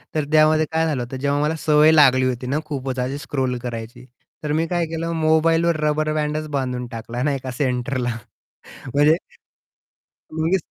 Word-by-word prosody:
तर 150 -2 0
त्यामध्ये 155 0 +4
काय 160 0 +1
झालं 140 -6 -1
होतं, 130 +2 -7
जेव्हा 140 +2 0
मला 155 +2 0
सवय 155 0 +6
लागली 130 -4 +5
होती 125 0 -3
ना, 145 +4 0
खूपच 135 -3 -4
अशी 130 +3 -2
स्क्रोल 130 -3 -2
करायची, 115 +1 -7 0.4
तर 150 - -2
मी 165 +1 +1
काय 175 -1 0
केलं 165 +1 -3
मोबाईलवर 165 +1 +3
रबर 155 0 0
बँड 150 0 -1 0.2
बांधून 125 -2 -3
टाकला 115 +2 -5
नाही 140 -2 0
का 130 - -4
सेंटरला. 125 -2 -2 0.8
म्हणजे 150 +2 +5 1.2
मग. 160 +4 +1
145 Hz, 165 wpm, -21 LUFS, 130-155 Hz, 1.2 s, सवय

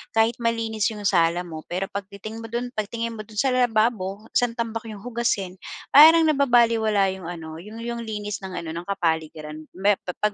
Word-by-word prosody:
Kahit 225 +1 +3
malinis 225 -2 0
yung 210 -1 -8
sala 170 -1 +3
mo 160 -3 -8
pero 185 +2 -2
'pag 200 -1 -4
titingin 215 +3 -8
mo - - -6
do'n 245 +1 -3
pag 215 -1 -1
tingin 230 0 -3
mo 215 - -6
do'n 210 0 -7
sa 265 +2 +3
lababo, 220 -4 +1
'sang 245 -1 +2
tambak 230 -1 -2
yung 205 -2 -9
hugasin, 230 -6 -1 0.4
parang 320 +3 +9
nababalewala 230 -8 +3
yung 185 -3 -9
ano, 160 -2 -8
yung 215 +3 -10
yung 235 0 -4
linis 210 -2 -4
ng 190 -1 -6
ano, 165 -1 -6
ng 170 +1 -5
kapaligiran. 160 -4 -2
Me 200 +2 +3
pa 180 - -3
'pag 210 0 +2
215 Hz, 195 wpm, -24 LUFS, 185-230 Hz, 0.4 s, parang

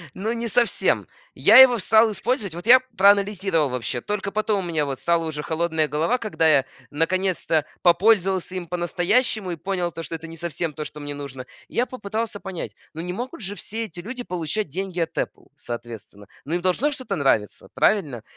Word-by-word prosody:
Ну, 215 +4 -2
не 235 0 -3
совсем. 235 +2 +2 0.3
Я - - +6
его 255 -2 +9
стал 220 +3 +4
использовать. 210 - -2
Вот 175 - -8
я 255 +2 +9 0.2
проанализировал 195 -5 +3
вообще. 125 -1 -3
Только 200 - -3
потом 210 -2 0
у - - -5
меня 155 -3 0
вот 135 -1 -4
стала 170 -1 +1
уже 150 -2 -4
холодная 160 -1 0
голова, 165 +12 0
когда 210 -8 0
я 140 -3 +4 0.3
наконец-то 165 0 0 0.2
попользовался 190 0 +3
им 180 -2 -5
по-настоящему 180 +4 0
и 170 - -4
понял 180 +1 -2
то, 165 0 -7
что 165 - -5
это 165 - -8
не 165 - -10
совсем 165 -1 -3
то, 150 - -5
что 150 - -9
мне 145 0 -5
нужно. 135 -3 -8 0.2
Я 245 - 0
попытался 220 -3 -4
понять, 190 -4 -6 0.2
ну 160 - -4
не 180 +1 -4
могут 245 +4 -6
же 200 0 -4
все 225 +2 -4
эти 175 -3 -10
люди 245 +6 -6
получать 180 0 -3
деньги 185 +2 -4
от 165 - -2
Apple, - - -4
соответственно. 115 -4 -8 0.2
Но 160 +5 -2
им 175 - -1
должно 185 +11 +2
что-то 255 -8 -4
нравиться, 135 - 0
правильно? 145 - +1
180 Hz, 190 wpm, -23 LUFS, 155-210 Hz, 0.3 s, его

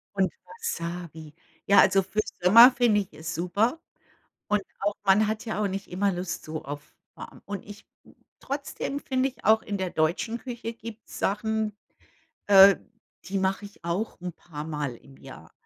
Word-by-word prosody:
Und 190 -1 +2
Wasabi. 170 - -6 0.3
Ja, 200 - +6
also 195 0 +5
für 195 +3 -4 0.2
Sommer 230 +8 +9
finde 235 -5 +3
ich 195 - -9
es 160 +1 -6
super 200 - 0 0.7
und 210 -1 +1 0.2
auch 205 +1 0
man 200 +2 +4
hat 215 +1 -3
ja 220 -2 -2
auch 205 - +1
nicht 195 +1 -5
immer 195 +2 0
Lust 180 -1 -4
so 155 0 -6
auf 145 +1 -8 0.2
warm. - - -11
Und 200 -1 -6
ich 205 0 -12 0.5
trotzdem 280 0 -4
finde 260 -1 0
ich 260 - -21
auch 220 +2 +5
in 205 -1 -4
der 190 -1 -2
deutschen 170 +9 0
Küche 235 -2 -6
gibt's 225 0 -10
Sachen, 215 +1 -1 0.7
äh, 195 -1 +8 0.5
die 195 0 -2
mach 190 +1 0
ich 200 -4 -13
auch 175 +6 -3
'n 180 0 -5
paarmal 150 -5 -5
im 135 +3 -18
Jahr. 105 -14 -13
200 Hz, 165 wpm, -26 LUFS, 175-220 Hz, 0.7 s, Sommer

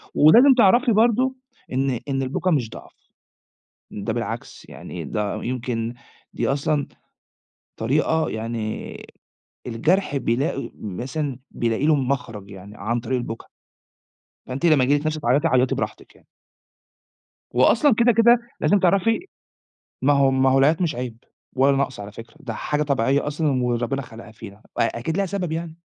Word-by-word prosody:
ولازم 240 - +7
تعرفي 240 +4 +5
برضه 240 +4 +3 0.4
إن 130 -2 0
إن 135 0 0
البُكى 160 +8 -1
مش 125 -8 +1
ضعْف. - - -12 1.0
ده - - -4
بالعكس - - -5
يعني - - -8
ده 105 -1 -3
يمكن، 120 -2 -3 0.4
دي - - -1
أصلًا 140 +1 0 0.9
طريقة 155 +6 +1
يعني 110 0 -4 0.7
الجرْح 145 - +1
بيلاقي، 135 +4 -1
مثلًا 125 - -4
بيلاقي 115 +4 -1
له 155 -1 +5
مخرَج 125 -7 -3
يعني 100 +2 -11
عن 115 +4 -1
طريق 125 +2 -2
البُكى. 115 -2 -6 1.0
فأنت 135 +6 -2
لمّا 150 -6 +5
ييجي 145 +3 +3
لك 155 - -5
نِفس 155 0 -1
تعيّطي 145 +5 +2
عيّطي 130 -2 +2
براحتِك - - -5
يعني. - - -24 1.3
وأصلًا 230 - +4
كده، 235 +2 +4
كده، 235 +2 +5 0.2
لازم 205 - +3
تعرَفي 195 +5 +2 0.8
ما 145 +2 +4
هو 140 -1 +4
ما 130 0 +3
هو 135 - +4
العياط 150 +5 +3
مش 160 -3 0
عيب 120 -3 -6 0.3
ولا 135 +1 +4
نقْص 135 -5 -2
على 100 0 -8
فكرة، 115 +6 -12
ده 120 -6 -6
حاجة 150 +7 -1
طبيعية 140 0 +1
أصلًا 145 -4 0
وربنا 125 +3 -1
خلقها 115 -2 -12
فينا 105 -2 -11
أ 105 - -24 0.4
أكيد 160 +8 -3
ليها 195 -1 +1
سبب 185 -3 -3
يعني، 165 0 -5
135 Hz, 150 wpm, -23 LUFS, 120-160 Hz, 1.3 s, ولازم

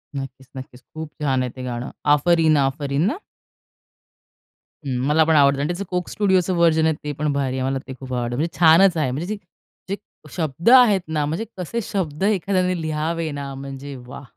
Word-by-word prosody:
नक्कीच-नक्कीच. 130 -1 -8
खूप 160 -1 -6
छान 135 -3 +1
आहे 125 - -4
ते 130 - -6
गाणं. 120 0 -5 0.2
"आफरीन 160 0 +3
आफरीन" 140 +1 -2
ना? 315 - -4 1.7
हं, 130 -2 -2
मला 155 +2 +4
पण 160 0 +3
आवडतं 140 -1 +4
आणि 145 - 0
त्याचं 175 +3 -3
कोक 180 -1 -2
स्टुडिओच 190 -3 +1
व्हर्जन 165 -3 +3
आहे, 160 - +3
ते 150 - -3
पण 150 -1 0
भारी 135 -2 -1
आहे. 130 - 0
मला 135 0 -1
ते 130 - -6
खूप 130 -1 -7
आवडतं, 120 -1 -2
म्हणजे 155 +2 -2
छानच 170 +2 +6
आहे, 145 -5 0
म्हणजे 150 +7 -4
जे - - -10 0.5
जे 200 - 0 0.4
शब्द 160 - 0
आहेत 240 -7 +7
ना, 155 -2 -1
म्हणजे 165 +10 -3
कसे 190 +6 -3
शब्द 180 -5 -3
एखाद्याने 185 -3 +1
लिहावे 160 +1 -2
ना, 140 -1 -5
म्हणजे 135 +1 -7
वाह! 135 - -9
155 Hz, 185 wpm, -22 LUFS, 135-175 Hz, 1.7 s, आहेत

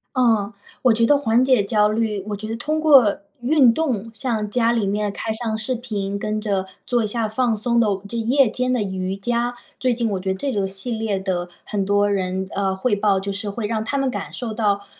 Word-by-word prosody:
哦， 225 -4 +2 0.3
我 250 -3 +5
觉 230 +1 +3
得 290 +5 +5
缓 245 -3 +2
解 255 -5 +4
焦 210 +1 +2
虑 215 -2 -1
我 205 - -2
觉 215 +1 -6
得 225 - -3
通 305 +7 -2
过 275 -9 +5 0.2
运 255 -2 +5
动 235 -9 -1
像 215 -2 -2
家 235 +1 +2
里 225 -4 0
面 205 0 -1
开 220 +2 -4
上 220 -1 -2
视 220 +4 -2
频 205 -5 -3
跟 215 +1 -2
着 200 -3 -1 0.2
做 240 -2 +2
一 215 - 0
下 225 +1 -1
放 230 +1 +1
松 235 +2 +2
的 220 - +3 0.2
这 235 - -4
夜 245 +2 +3
间 250 +2 -1
的 245 -4 +1
瑜 190 -1 -3
伽， 240 +4 -1 0.2
最 255 -1 +1
近 230 -1 -1
我 195 - -1
觉 190 +1 -2
得 - - -1
这 275 +5 -2
个 200 -2 0
系 195 +5 -4
列 220 -3 -1
的 180 -2 -2 0.2
很 205 -2 -1
多 205 +1 +2
人， 190 -1 -1
呃， 195 -1 0
汇 205 +3 0
报， 200 -1 +2
就 200 +1 -4
是 205 +1 -3
会 210 +1 -3
让 220 0 -1
他 280 +5 -2
们 270 -1 +1
感 - - -5
受 235 -3 -5
到 205 -2 0
220 Hz, 250 characters per minute, -22 LUFS, 200-240 Hz, 0.3 s, 我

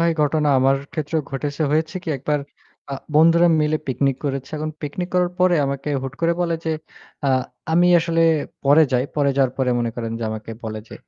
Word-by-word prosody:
ভাই 170 0 +3
ঘটনা 150 0 +1
আমার 135 +1 +3 0.2
ক্ষেত্রেও 155 0 -2
ঘটেছে। 145 +3 -3
হয়েছে 160 +3 0
কি - - -6
একবার 150 +3 0 0.5
আ - - -1 0.2
বন্ধুরা 165 +2 +6
মিলে 150 +1 +2
পিকনিক 135 0 0
করেছে। 135 -1 -3
এখন 155 +1 -3
পিকনিক 165 +5 -4
করার 180 -1 +2
পরে 180 -1 +4
আমাকে 140 +1 -3
হুট 135 -1 -5
করে 170 0 +3
বলে 170 -1 +1
যে 160 - 0 0.5
আ - - +3 0.4
আমি 175 +2 +4
আসলে 165 0 +1 0.4
পরে 145 +3 +6
যাই। 125 +1 +2
পরে 140 -1 +3
যাওয়ার 135 -3 +2
পরে 130 -1 +1
মনে 120 -1 -1
করেন 115 -1 -4
যে 115 - -3
আমাকে 110 +1 -6
বলে 110 -1 -4
যে - - -10
150 Hz, 195 wpm, -21 LUFS, 135-165 Hz, 0.5 s, বন্ধুরা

